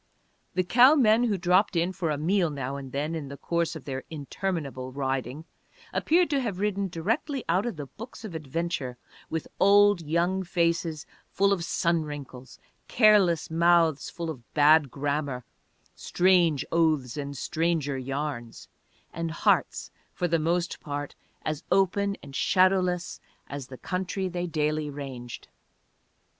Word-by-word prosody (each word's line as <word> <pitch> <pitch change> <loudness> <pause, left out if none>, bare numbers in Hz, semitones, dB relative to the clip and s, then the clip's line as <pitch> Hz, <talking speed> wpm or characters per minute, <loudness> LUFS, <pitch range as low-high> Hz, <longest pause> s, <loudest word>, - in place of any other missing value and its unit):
The 185 - +2
cow 250 - +6
men 235 -3 +4
who 210 -4 0
dropped 185 +2 +2
in 170 +2 +1
for 175 -3 -2
a 150 - 0
meal 175 +3 +1
now 140 -2 -4
and 135 -2 -7
then 145 +4 -2
in 155 -4 -4
the 140 +1 -8
course 170 +1 -1
of 155 - -9
their 135 -1 -4
interminable 145 -4 -4
riding 135 +2 -3 0.5
appeared 345 +2 +3
to 285 - +2
have 215 -7 -3
ridden 200 0 -1
directly 225 - -2
out 185 +7 +1
of 150 - -7
books 230 +1 -9
of 200 - -7
adventure, 155 -4 -3 0.3
with 160 -1 -3
old 205 -1 +5
young 170 +4 0
faces 170 -3 -1 0.2
full 200 +1 +2
of 180 -4 -2
sun 170 0 +1
wrinkles, 140 -4 -8 0.3
careless 205 -9 +4
mouths 165 -2 +3
full 165 -1 -4
of 130 -6 -9
bad 150 -1 +5
grammar, 140 -2 -2 0.5
strange 175 -5 +2
oaths 155 -7 +1
and 140 -1 -5
stranger 155 0 -1
yarns, 135 -2 -5 0.5
and 165 0 -3
hearts 160 - +1 0.2
for 175 - 0
the 165 -1 +1
most 170 +2 -1
part 145 -2 -5 0.3
as 155 +1 -3
open 195 +1 +2
and 140 -1 -10
shadowless 185 0 +2 0.3
as 140 -2 -6
the 130 - -10
country 185 +3 -3
they 180 -1 -3
daily 155 -1 -1
ranged. 135 -4 -8
165 Hz, 145 wpm, -27 LUFS, 145-185 Hz, 0.5 s, cow